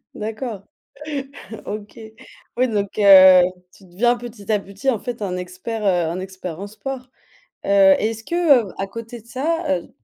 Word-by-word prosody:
D'accord. 215 -1 -5 1.0
OK. 210 +2 -7 0.6
Oui, 255 +1 +2
donc, 205 -2 -2
heu, 190 -2 +9 0.3
tu 195 - -19
deviens 240 +8 +1
petit 230 -4 -9
à 210 - +3
petit, 200 +7 -2
en 230 - -1
fait, 240 -3 -6
un 180 -2 -2
expert, 185 +5 -6
heu, 175 -4 +2
un 180 - -4
expert 185 -2 -7
en 200 - -5
sport. 255 +4 -7 0.6
Heu, 195 -1 +6
et 220 +1 0
est-ce 225 0 -9
que, 305 -9 +3
heu, - - -12
à 195 - -3
côté 230 +2 -9
de - - -29
ça, 325 +7 -2 0.2
heu - - -17
210 Hz, 175 wpm, -21 LUFS, 190-240 Hz, 1.0 s, heu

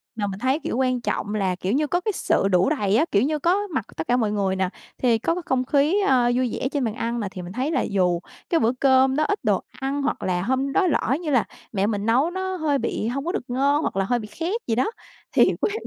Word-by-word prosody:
mà 205 -2 -2
mình 195 0 -5
thấy, 265 +4 +1
kiểu, - - -2
quan 255 -2 +1
trọng 210 -2 -2
là, 190 -3 0
kiểu 185 +3 -2
như, 295 +3 +1
có 350 +4 0
cái 430 - -1
sự 195 - +1
đủ 185 +3 +3
đầy 210 -9 +1
á. 310 - +3
Kiểu 200 +2 +3
như, 300 +2 0
có 385 +6 +1
mặt 220 - -1
tất 160 - -4
cả 245 - +3
mọi 215 -4 +1
người 195 -2 0
nà, 190 -1 0 0.3
thì 235 -3 +3
có 330 +9 0
cái 360 - -4
không 255 -1 0
khí, 290 +7 +2
a, 250 -2 +4
vui 255 -1 +1
vẻ 260 - -2
trên 285 -3 -1
bàn 225 -3 -1
ăn 235 +1 -2
nà, 210 - -2
thì 185 - -7
mình 175 +1 -8
thấy 265 +6 -1
là 265 - +1
dù 180 -3 +1 0.3
cái 330 - +3
bữa 230 - +3
cơm 265 -1 +4
đó 305 - +2
ít 405 +6 0
đồ - - +2 0.2
ăn 275 +2 -2
hoặc 285 - -2
là 180 -1 0
hôm 260 +5 0
đó 380 +3 +3
lỡ 275 -4 +1
như 325 - -3
là 250 -4 +4 0.3
mẹ 200 -2 0
mình 205 -2 -2
nấu 260 +9 +2
nó 375 0 -3
hơi 310 -5 +1
bị 215 - -2
hông 275 +4 -3
có 350 - 0
được 410 - -3
ngon 280 +4 +2
hoặc - - -2
là 195 - +1
hơi 240 +4 +1
bị 210 - -7
khét 350 - -3
gì 225 - +1
đó. 255 - +1 0.4
Thì - - +5 0.2
quên 410 - +1
255 Hz, 280 wpm, -23 LUFS, 210-300 Hz, 0.4 s, Thì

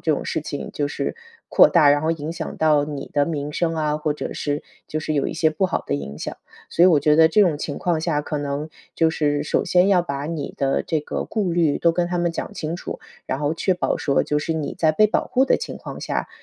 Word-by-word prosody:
这 160 - +1
种 - - -5
事 - - -2
情 145 -1 -6
就 145 - -1
是 140 -1 -3 0.3
扩 - - +7
大， 145 - +5
然 145 0 +3
后 160 +2 +1
影 160 0 -5
响 170 - -6
到 150 -2 +3
你 145 -2 -6
的 145 -1 +2
名 150 -2 -3
声 165 +1 0
啊， 150 -1 0
或 150 -1 -1
者 150 - -5
是 145 0 -2 0.2
就 155 - -3
是 155 0 -2
有 140 - +1
一 - - -4
些 160 -1 +2
不 190 +5 0
好 - - -2
的 - - -1
影 70 0 -6
响。 - - -5 0.3
所 170 - +4
以 - - +8
我 160 -5 +5
觉 150 0 +4
得 160 0 +7
这 165 +6 +3
种 170 -7 +3
情 145 - -4
况 170 -3 0
下， 155 -3 0
可 150 0 -4
能 145 +1 -3 0.3
就 160 -1 +3
是 145 -2 0
首 155 - 0
先 180 +1 +3
要 190 -3 +5
把 140 -4 -4
你 160 -2 -4
的 135 -1 0
这 160 - 0
个 150 - -4
顾 205 -5 -1
虑 165 -4 +2
都 170 - +4
跟 175 +1 0
他 175 0 -2
们 175 0 +1
讲 180 +4 -5
清 160 -2 -3
楚， - - -7 0.3
然 130 - -2
后 145 +1 0
确 185 +3 +1
保 180 - 0
说 140 - +1
就 150 - 0
是 155 +2 -2
你 155 -2 -3
在 155 -1 +3
被 215 +7 +5
保 - - 0
护 260 - +2
的 - - +3
情 - - -6
况 - - -8
下， - - -2
155 Hz, 285 characters per minute, -22 LUFS, 145-170 Hz, 0.3 s, 以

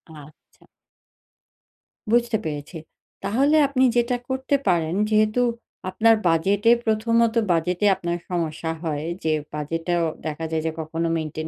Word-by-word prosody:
আচ্ছা। 150 0 -17 1.5
বুঝতে 235 -1 +2
পেরেছি। 150 +2 -5 0.5
তাহলে 270 +10 +2
আপনি 265 -2 +1
যেটা 240 +1 +1
করতে 265 +2 0
পারেন 165 -1 +1
যেহেতু 215 +2 +2 0.5
আপনার 225 +4 +4
বাজেটে 195 +7 +3
১ম 220 +1 +1 0.2
ত - - -14 0.2
বাজেটে 180 +4 0
আপনার 170 -1 -3
সমস্যা 165 -2 -2
হয় 155 -2 -3 0.2
যে 160 - +1 0.2
বাজেট 150 +2 -3
টাও 175 -1 +1 0.2
দেখা 155 +1 -4
যায় 160 -1 -1
যে - - -1
কখনো 165 +1 -2
মেইনটেইন 155 0 -4
175 Hz, 130 wpm, -23 LUFS, 160-225 Hz, 1.5 s, আপনার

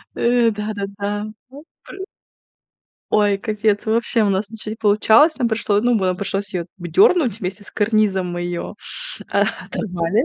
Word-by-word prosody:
Э, 235 -1 +3
да-да-да. 205 0 -4 0.2
Вот 285 +4 -13 0.2
пры 380 0 -9 1.1
Ой, 205 -2 +3
капец 210 -1 -1
вообще, 230 0 +2
у 205 - +2
нас 195 +2 -1
ничего 215 -1 -7
не - - -4
получалось. 220 +8 +4
Нам 245 -3 +1
пришло 220 -2 +1
ну 245 0 +2
нам 185 -3 +1
пришлось 200 0 -3
ее 170 -2 -2
в 175 -1 -7
дернуть 320 - +3
вместе 195 +1 -5
с - - -13
карнизом, 205 -4 +1
мы 175 0 -4
ее, 175 0 -4 0.6
а, - - +2
о - - +4 0.2
оторвали. 185 - -1
210 Hz, 165 wpm, -20 LUFS, 195-230 Hz, 1.1 s, получалось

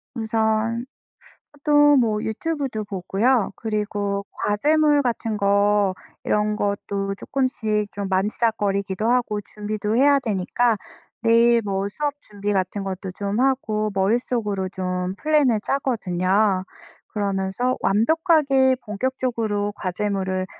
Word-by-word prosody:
우선 220 +1 0 0.7
보통 290 -1 +4
뭐 215 -3 +1
유튜브도 265 -2 -3
보고요. 200 +4 +1
그리고 205 -2 -2
과제물 295 +7 +2
같은 230 -3 -2
거 200 -1 +3 0.3
이런 210 0 +1
것도 200 -1 -2
쪼끔씩 215 -5 -1
좀 200 -1 -4
만지작거리기도 200 +1 0
하고 240 -4 +1
준비도 210 +1 -4
해야 280 +2 +5
되니까. 220 +1 0 0.5
내일 230 0 +5
뭐 195 0 -1
수업 290 +7 -2
준비 205 0 -4
같은 190 +1 -1
것도 190 -1 -5
좀 200 +2 -2
하고 225 -5 +1
머릿속으로 205 -1 0
좀 185 0 -3
플랜을 285 -4 +2
짜거든요. 195 -7 +1 0.4
그러면서 200 +4 -1
완벽하게 275 - +3
본격적으로 215 -2 -2
과제물을 190 0 -2
210 Hz, 260 characters per minute, -23 LUFS, 200-245 Hz, 0.7 s, 해야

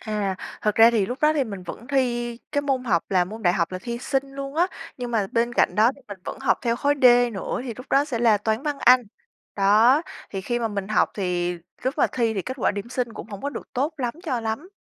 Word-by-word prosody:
À, 210 -4 -2 0.3
thật 210 -1 +1
ra 225 +1 +7
thì 210 -5 +1
lúc 250 +4 -4
đó 305 0 +4
thì 285 -4 +1
mình 200 -5 -7
vẫn 200 +6 -8
thi 240 -3 0
cái 285 - +1
môn 265 -3 -1
học 175 -8 +2
là 185 -2 +3
môn 220 +4 -9
đại 175 -1 +4
học 170 0 -1
là 185 - -3
thi 235 -1 -4
Sinh 270 +1 -2
luôn 275 +1 -6
á. 345 +3 +3 0.3
Nhưng 245 -1 -5
mà 215 -4 +1
bên 235 +1 +1
cạnh - - +3
đó 220 +3 +5 0.2
mình 200 -2 -8
vẫn - - -6
học - - +2
theo 235 -1 +1
khối 285 +2 +2
D - - +3 0.3
nữa 195 +4 -3
thì 235 -4 -5
lúc 255 - -10
đó 280 +1 +4
sẽ 255 -6 -3
là 225 -3 +4
Toán, 220 +4 -1
Văn, 295 -2 -2
Anh. 250 0 +6 0.5
Đó, 220 +9 +5 0.3
thì 195 - -4
khi 240 +5 -2
mà 230 -1 -1
mình 200 -1 -4
học 215 - +2
thì 180 -2 -1 0.3
lúc 260 +3 -1
mà - - +5
thi 230 -3 0
thì 195 - -2
kết 260 +1 -5
quả - - +3
điểm 205 +3 -5
Sinh 245 -2 -2
cũng - - -8
hổng 230 +8 -5
được - - -8
tốt 285 +5 -1
lắm 245 -2 -2
cho 260 -9 -2
lắm. 225 +11 -4
235 Hz, 260 wpm, -24 LUFS, 205-265 Hz, 0.5 s, ra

